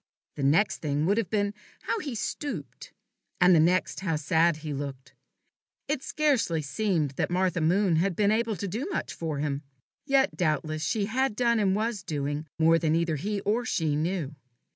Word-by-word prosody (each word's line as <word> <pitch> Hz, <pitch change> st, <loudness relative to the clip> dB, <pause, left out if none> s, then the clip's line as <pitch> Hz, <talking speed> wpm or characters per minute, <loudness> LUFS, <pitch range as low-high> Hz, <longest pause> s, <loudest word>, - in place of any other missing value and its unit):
The -, -, -5 dB
next 155 Hz, +10 st, +3 dB
thing 150 Hz, 0 st, -1 dB
would 200 Hz, +5 st, +2 dB
have 205 Hz, -7 st, -2 dB
been, 205 Hz, 0 st, 0 dB, 0.3 s
how 460 Hz, -, -1 dB
he 285 Hz, -, -5 dB
stooped; 220 Hz, -, -5 dB, 0.5 s
and 180 Hz, +1 st, +6 dB
the 165 Hz, -, +6 dB
next, 180 Hz, +4 st, +2 dB
how 185 Hz, -5 st, -1 dB
sad 160 Hz, +2 st, +2 dB
he 150 Hz, -, -3 dB
looked. 135 Hz, -2 st, -6 dB, 0.7 s
It 285 Hz, -2 st, -1 dB
scarcely 255 Hz, -, +1 dB
seemed 165 Hz, -2 st, 0 dB
that -, -, 0 dB
Martha 180 Hz, -1 st, +1 dB
Moon 180 Hz, +1 st, +3 dB
had 180 Hz, +2 st, +1 dB
been 205 Hz, +2 st, +3 dB
able 225 Hz, 0 st, +1 dB
to 200 Hz, -, -4 dB
do 230 Hz, -, -3 dB
much -, -, -3 dB
for 160 Hz, -3 st, -4 dB
him. 140 Hz, -1 st, -2 dB, 0.5 s
Yet 275 Hz, 0 st, +3 dB
doubtless 155 Hz, -2 st, -1 dB
she 215 Hz, +1 st, 0 dB
had 255 Hz, +2 st, 0 dB
done, 235 Hz, -1 st, +2 dB
and 195 Hz, -2 st, +2 dB
was 215 Hz, -1 st, -1 dB
doing, 145 Hz, -3 st, -3 dB
more 165 Hz, 0 st, +4 dB
than 160 Hz, -1 st, +1 dB
either 165 Hz, -2 st, 0 dB
he 200 Hz, +6 st, -2 dB
or 220 Hz, +4 st, 0 dB
she 160 Hz, -9 st, 0 dB
knew. 160 Hz, -2 st, -2 dB
180 Hz, 185 wpm, -27 LUFS, 155-215 Hz, 0.7 s, and